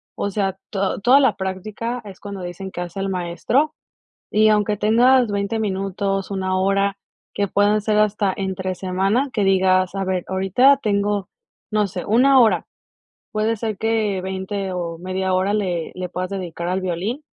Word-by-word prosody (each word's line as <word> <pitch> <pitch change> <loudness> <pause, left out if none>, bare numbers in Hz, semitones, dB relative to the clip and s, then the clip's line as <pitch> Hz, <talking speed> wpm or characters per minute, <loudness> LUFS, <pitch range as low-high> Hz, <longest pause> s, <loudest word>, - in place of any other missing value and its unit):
o 200 - -2
sea, 195 -2 -1
to 195 -1 -1
toda 250 +7 +6
la 260 -6 +3
práctica 210 +6 -4
es 195 -2 -10
cuando 200 -2 -7
dicen 180 +2 -6
que 175 - -5
hace 175 +2 -6
al 195 - -1
maestro 185 - 0 0.6
y 215 +1 +5
aunque 210 0 +2
tengas 240 +3 +4
veinte 200 +2 -1
minutos, 195 -1 -2
una 185 -1 -1
hora 195 +1 +1 0.4
que 200 - 0
pueden 205 +2 +3
ser 210 0 +1
hasta 210 -2 +2
entre 190 -1 -3
semana, 195 +9 0
que 210 - 0
digas 185 -1 +3
a 195 - -2
ver, 185 -1 -1
ahorita 195 +9 +4
tengo, 205 -1 0 0.4
no 210 -1 +2
sé, 185 -2 -6
una 260 +5 +5
hora. 225 -3 +3 0.7
Puede 220 +1 0
ser 215 -2 -3
que 220 -3 0
veinte 190 +1 -4
o 170 -2 -4
media 185 +1 -2
hora 190 +2 +1
le 180 -6 -2
le 185 0 -4
puedas 185 0 -3
dedicar 175 -3 -4
al 185 +1 -1
violín 185 - -3
195 Hz, 170 wpm, -21 LUFS, 185-215 Hz, 0.7 s, toda